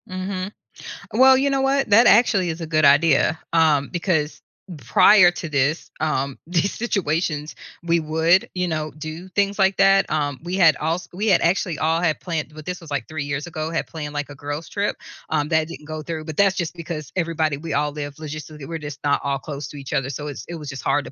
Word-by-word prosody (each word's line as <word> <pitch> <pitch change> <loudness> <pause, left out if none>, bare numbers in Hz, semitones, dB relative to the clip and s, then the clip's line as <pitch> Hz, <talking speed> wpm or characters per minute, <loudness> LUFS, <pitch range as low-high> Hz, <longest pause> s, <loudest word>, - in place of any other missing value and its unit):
Mhm. 185 +1 -4 0.6
Well, 260 +3 +7
you 275 +2 +2
know 275 -1 +1
what? 270 -2 +1
That 225 +4 +6
actually 200 -5 +4
is 165 +1 -5
a 165 - -4
good 155 -1 +2
idea. 145 +2 +4
Um, 155 -4 +3
because 160 -4 -1 0.4
prior 175 - +6
to 175 -1 -6
this, 145 +1 0
um, 140 -3 -1
these 175 +3 0
situations, 160 -8 -1 0.3
we 170 0 +2
would, 160 +3 +2
you 180 0 0
know, 155 -2 -2
do 155 +4 -7
things 200 +2 0
like 190 0 +3
that. 195 0 +4
Um, 145 -3 -1
we 175 +3 -4
had 165 -6 +5
als 165 +3 -2
we 205 +5 -2
had 190 -5 +4
actually 175 -1 +1
all 160 +1 +1
had 165 -3 +1
planned, 160 -4 -4
but 155 -1 -10
this 180 0 -5
was 165 - -12
like 145 -1 -3
3 155 -2 -4
years 145 +1 -3
ago, 160 -2 -4
had 165 0 -2
planned, 150 -3 -7
like, 145 0 -3
a 145 - -9
girls 145 +3 -5
trip, 205 0 -2 0.3
um, 150 -1 0
that 160 -1 +2
didn't 155 -2 -10
go 155 0 -5
through, 160 0 -5
but 155 -1 -6
that's 195 -1 +4
just 175 -3 -3
because 165 -3 -7
everybody 165 -4 0
we 160 +1 -5
all 145 +1 0
live 145 -1 -6
logistically 150 -1 -8
we're 165 -1 -5
just 145 -2 -7
not 145 -1 +1
all 140 -1 0
close 140 0 -7
to 145 - -10
each 135 0 -7
other. 135 -3 0
So 145 +2 -5
it's 135 -7 -7
it 170 - -6
was 150 -3 -7
just 135 -2 -6
hard 145 - +1
to - - -9
160 Hz, 225 wpm, -22 LUFS, 150-180 Hz, 0.6 s, Well